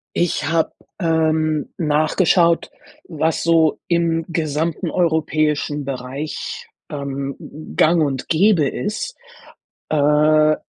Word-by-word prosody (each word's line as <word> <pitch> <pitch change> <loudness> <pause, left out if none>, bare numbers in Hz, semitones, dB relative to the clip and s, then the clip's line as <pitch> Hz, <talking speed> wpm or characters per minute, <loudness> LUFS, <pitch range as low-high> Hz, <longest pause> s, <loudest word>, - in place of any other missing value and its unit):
Ich 160 -4 0
habe, 165 0 +1 0.3
ähm, 160 -2 +1
nachgeschaut, 165 +2 +2 0.4
was 160 -1 -1
so 165 -2 +3
im 165 -1 +1
gesamten 160 0 -2
europäischen 155 -3 0
Bereich, 135 +3 -5 0.2
ähm, 140 -1 -4 0.4
gang 165 0 +4
und 135 -3 -2
gäbe 170 -3 +3
ist. 215 - -4 0.7
Äh, 155 +1 +4
155 Hz, 90 wpm, -20 LUFS, 150-165 Hz, 0.7 s, gang